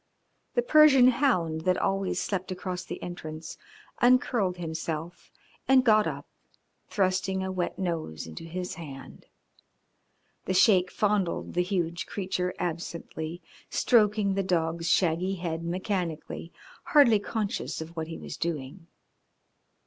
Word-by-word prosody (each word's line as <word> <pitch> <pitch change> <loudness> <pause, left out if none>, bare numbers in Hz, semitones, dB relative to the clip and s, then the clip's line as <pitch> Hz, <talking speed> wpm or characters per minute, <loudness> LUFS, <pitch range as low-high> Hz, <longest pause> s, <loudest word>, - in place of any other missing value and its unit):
The 485 - +3
Persian 305 - +7
hound 205 - +1
that 180 +2 +2
always 195 -1 0
slept 190 -1 -3
across 180 0 -4
the - - -7
entrance 160 -2 -7 0.5
uncurled 240 -6 +3
himself 165 0 -5 0.4
and 265 -1 +6
got 215 -2 +5
up, - - -5 0.6
thrusting 190 -1 0
a 190 - -3
wet 180 -2 -2
nose 165 - -3
into 80 - -9
his 180 +2 -5
hand. 140 -5 -10 1.2
The 185 - -1
Sheik 185 -2 +5
fondled 200 -4 0
the 180 - +2
huge 175 -2 -2
creature 185 -2 -2
absently, 170 0 -5 0.3
stroking 210 -4 +3
the 195 - 0
dog's 165 -2 0
shaggy 180 +2 +2
head 170 -2 -4
mechanically, 175 -2 -3 0.3
hardly 285 -11 +5
conscious 210 0 -3
of 160 +1 -8
what 160 -1 -3
he 165 - -6
was - - -8
doing. 165 +1 -4
180 Hz, 125 wpm, -28 LUFS, 165-200 Hz, 1.2 s, Persian